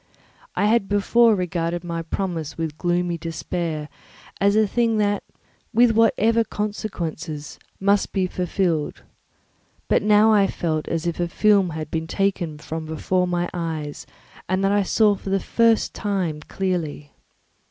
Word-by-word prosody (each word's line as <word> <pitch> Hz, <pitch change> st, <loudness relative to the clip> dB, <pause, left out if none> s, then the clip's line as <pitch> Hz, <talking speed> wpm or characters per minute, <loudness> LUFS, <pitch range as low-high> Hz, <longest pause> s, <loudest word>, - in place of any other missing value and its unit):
I -, -, +2 dB
had 215 Hz, -2 st, +2 dB
before 220 Hz, +3 st, +4 dB
regarded 175 Hz, -2 st, -2 dB
my 170 Hz, -1 st, -3 dB
promise 165 Hz, -3 st, -4 dB
with 165 Hz, -1 st, -2 dB
a 150 Hz, -, -28 dB
gloomy 175 Hz, -1 st, 0 dB
despair 165 Hz, -1 st, -3 dB, 0.5 s
as 200 Hz, +1 st, +3 dB
a 215 Hz, 0 st, +5 dB
thing 230 Hz, +1 st, +1 dB
that, 205 Hz, -1 st, +1 dB, 0.5 s
with 240 Hz, 0 st, +6 dB
whatever 225 Hz, 0 st, +3 dB
consequences, 175 Hz, -8 st, -5 dB, 0.2 s
must 200 Hz, +1 st, +2 dB
be 190 Hz, -2 st, +1 dB
fulfilled; 180 Hz, -4 st, -1 dB, 0.8 s
but -, -, +3 dB
I -, -, -6 dB
now 210 Hz, -1 st, +5 dB
felt 155 Hz, -3 st, -2 dB
as 165 Hz, 0 st, -2 dB
if 170 Hz, 0 st, -2 dB
a 175 Hz, -, +1 dB
film 200 Hz, 0 st, +3 dB
had 155 Hz, -1 st, -6 dB
been 160 Hz, 0 st, -2 dB
taken 180 Hz, -4 st, -1 dB
from 160 Hz, +1 st, -6 dB
before 180 Hz, +4 st, 0 dB
my 175 Hz, 0 st, 0 dB
eyes 160 Hz, -4 st, -4 dB, 0.4 s
and 185 Hz, +1 st, +1 dB
that 195 Hz, -, +3 dB
I 205 Hz, 0 st, +3 dB
for 205 Hz, +1 st, +3 dB
the 195 Hz, 0 st, +2 dB
first 230 Hz, +2 st, +2 dB
time 185 Hz, -7 st, -2 dB
saw -, -, -16 dB
clearly. 170 Hz, -6 st, -2 dB
180 Hz, 150 wpm, -23 LUFS, 165-205 Hz, 0.8 s, with